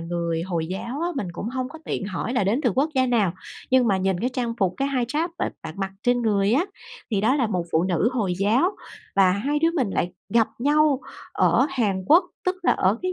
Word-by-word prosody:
người 170 -1 -2
Hồi 170 -3 -2
giáo 235 - -5
á, 340 - 0
mình 195 -8 -2
cũng 205 +6 -5
hông 255 0 -3
có 320 +4 -11
tiện - - -3
hỏi 205 +4 -3
là 245 -6 +1
đến 220 +8 +1
từ 245 - +3
quốc 290 +4 +1
gia 260 -1 +3
nào 220 -8 +2 0.4
nhưng 255 -2 +4
mà 195 - +3
nhìn 190 -1 0
cái 245 - +1
trang 240 -2 -2
phục, 185 -3 +1
cái 275 +1 0
hijab 275 +6 -1
b - - -3 0.2
bạn 160 -1 -7
mặc 195 0 -3
trên 245 -1 +2
người 205 -1 +2
á 295 +8 +3 0.5
thì 205 -3 +1
đó 230 +5 +3
là 250 -5 +2
một 180 -5 -1
phụ 160 - +3
nữ 185 +5 +1
Hồi 205 -8 0
giáo. 240 - +2 0.4
Và 190 -2 +6
hai 275 +10 0
đứa 325 +2 +3
mình 260 - 0
lại 175 -1 -1 0.2
gặp 225 +2 +3
nhau 290 +1 +3 0.3
ở - - +3
Hàn 205 -8 0
Quốc, 340 - +6 0.2
tức 370 0 0
là - - +4
ở 195 +5 +1
cái 370 - -1
230 Hz, 240 wpm, -24 LUFS, 190-265 Hz, 0.5 s, Và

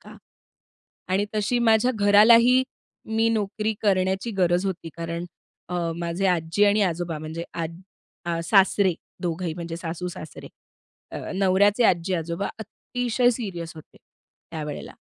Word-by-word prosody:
का - - -14 0.9
आणि 190 +2 +1
तशी 215 +3 +1
माझ्या 225 +1 +4
घरालाही 230 +5 +6 0.5
मी 225 0 +3
नोकरी 215 0 -1
करण्याची 190 +1 +1
गरज 175 +1 +2
होती, 180 -3 -4
कारण 170 0 -4 0.4
अ, 180 - -4 0.2
माझे 170 +3 -1
आजी 175 +2 +2
आणि 205 +1 +3
आजोबा 175 -3 -2
म्हणजे 160 +2 -6
आज 165 -1 -3 0.5
अ, 170 -1 -2
सासरे 195 -1 +4 0.3
दोघंही 170 -1 -2
म्हणजे 170 -1 -6
सासू-सासरे. 170 -1 -7 0.6
अ, - - -4 0.2
नवऱ्याचे 200 +4 +3
आज्जी-आजोबा 170 0 0
अतिशय 245 +3 -1
सीरियस 190 -9 -5
होते 155 - -14 0.5
त्यावेळेला. 150 -3 -6
185 Hz, 120 wpm, -24 LUFS, 170-210 Hz, 0.9 s, घरालाही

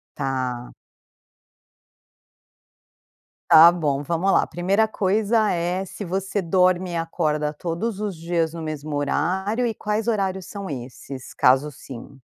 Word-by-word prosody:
Tá. 130 -3 -3 2.8
Tá 165 +2 +9
bom, 145 -5 -1
vamos 170 +6 0
lá. - - +3
Primeira 195 +5 +1
coisa 215 +2 +1
é 180 +2 -1
se 205 - -8
você 190 +2 -2
dorme 180 +1 +2
e - - -3
acorda 155 -2 -1
todos 180 +7 -3
os 205 -4 -3
dias 165 -1 -1
no 165 - -6
mesmo 155 -1 -5
horário 190 +10 0
e 225 - -2
quais 210 +2 -2
horários 190 -4 -1
são 200 -2 -7
esses? 130 0 -8
Caso 135 +4 +3
sim. 135 0 -11
175 Hz, 125 wpm, -23 LUFS, 150-195 Hz, 2.8 s, Tá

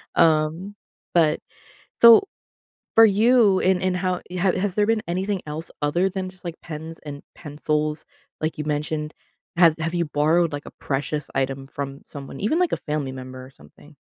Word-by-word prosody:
Um, 165 +4 +2 0.4
but 160 -3 +3 0.6
So, 235 -1 +9 0.7
for 225 0 +9
you, 215 -1 +4
and 185 -1 +2
and 185 -1 +1
how 180 0 -1
you 180 0 -5
ha 185 -1 +2
has 190 0 -1
there 210 - +3
been 225 -1 +2
anything 190 +2 -1
else 155 +2 -5
other 170 +6 +1
than 190 -1 -4
just, 185 -1 -17
like, 170 -1 -4
pens 160 0 -8
and 145 -1 -7
pencils, 150 0 -2 0.3
like, 155 +1 -2
you 150 - -3
mentioned? 150 +1 -3 0.4
Have 170 -3 +6
have 165 +2 -2
you 170 -1 0
borrowed, 155 +3 +2
like, 145 - -5
a - - -10
precious 145 +1 -3
item 135 0 -2
from 140 0 -6
someone, 140 -1 -9
even, 250 - +1
like, 360 -1 +2
a - - 0
family 150 -3 -3
member 130 0 -9
or - - -14
something? 145 +2 -19
160 Hz, 180 wpm, -23 LUFS, 150-185 Hz, 0.7 s, So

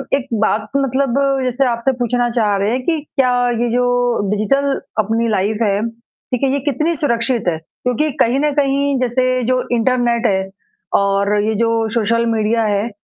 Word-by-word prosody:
एक 275 -2 -3 0.2
बात 215 0 -1
मतलब 270 -1 0 0.3
जैसे 255 +2 0
आपसे 235 +2 0
पूछना 245 0 0
चाह 210 -3 +2
रहे 200 +2 0
हैं 255 +2 -1
कि 325 -2 +1 0.2
क्या 260 -3 +3 0.3
ये 240 - +1
जो 245 +1 +1 0.5
डिजिटल 275 +7 +1 0.2
अपनी 225 +2 +1
लाइफ़ 210 +2 0
है, 205 -1 +1
ठीक 235 +2 -8
है, 270 - +2
ये 280 - 0
कितनी 310 +6 0
सुरक्षित 235 -4 0
है? 160 - -2 0.3
क्योंकि 250 +5 0
कहीं 245 +4 +2
न 300 +1 +1
कहीं 280 -1 +1
जैसे 255 0 0
जो 255 +1 +1
इंटरनेट 240 0 +1
है 190 -1 0 0.5
और 200 +1 +1
ये 220 +1 0
जो 230 +1 +1 0.2
सोशल 230 +1 +1
मीडिया 225 0 +1
है, 210 +1 0
235 Hz, 170 wpm, -17 LUFS, 220-260 Hz, 0.5 s, क्या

